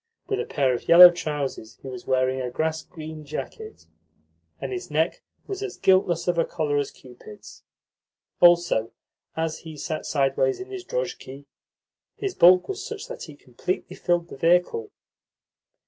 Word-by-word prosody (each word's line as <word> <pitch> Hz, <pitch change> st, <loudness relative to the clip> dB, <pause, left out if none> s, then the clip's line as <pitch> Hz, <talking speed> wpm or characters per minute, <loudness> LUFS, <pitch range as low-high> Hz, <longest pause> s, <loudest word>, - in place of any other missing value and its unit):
With 405 Hz, 0 st, -2 dB
a 460 Hz, -, -2 dB
pair 135 Hz, -, +1 dB
of 120 Hz, -, -5 dB
yellow 175 Hz, +1 st, +10 dB
trousers 145 Hz, -9 st, -5 dB
he -, -, -8 dB
was 125 Hz, -2 st, -8 dB
wearing 130 Hz, 0 st, +1 dB
a 125 Hz, -, -3 dB
grass 160 Hz, +5 st, -2 dB
green 155 Hz, -2 st, -9 dB
jacket, 435 Hz, -, -8 dB, 0.7 s
and -, -, -5 dB
his 370 Hz, 0 st, -6 dB
neck -, -, 0 dB, 0.2 s
was 395 Hz, -1 st, -6 dB
as 405 Hz, -2 st, -5 dB
guiltless 180 Hz, -3 st, +2 dB
of 175 Hz, -1 st, +1 dB
a -, -, +4 dB
collar 150 Hz, -4 st, -1 dB
as 140 Hz, -, -2 dB
Cupid's. 125 Hz, -5 st, -14 dB, 0.8 s
Also, 175 Hz, -10 st, +4 dB, 0.4 s
as 160 Hz, -1 st, -2 dB
he 160 Hz, -2 st, -10 dB
sat 155 Hz, +2 st, -4 dB
sideways 135 Hz, -2 st, +1 dB
in 385 Hz, +1 st, -8 dB
his 380 Hz, -2 st, -6 dB
drozhki, 145 Hz, -, -5 dB, 0.7 s
his 395 Hz, -2 st, -3 dB
bulk 180 Hz, -, +6 dB
was 395 Hz, 0 st, -5 dB
such 445 Hz, +1 st, -7 dB
that -, -, -7 dB
he 150 Hz, -, -12 dB
completely 140 Hz, +7 st, -5 dB
filled 175 Hz, -1 st, 0 dB
the -, -, -10 dB
vehicle. 180 Hz, -, +2 dB
165 Hz, 160 wpm, -24 LUFS, 135-185 Hz, 0.8 s, yellow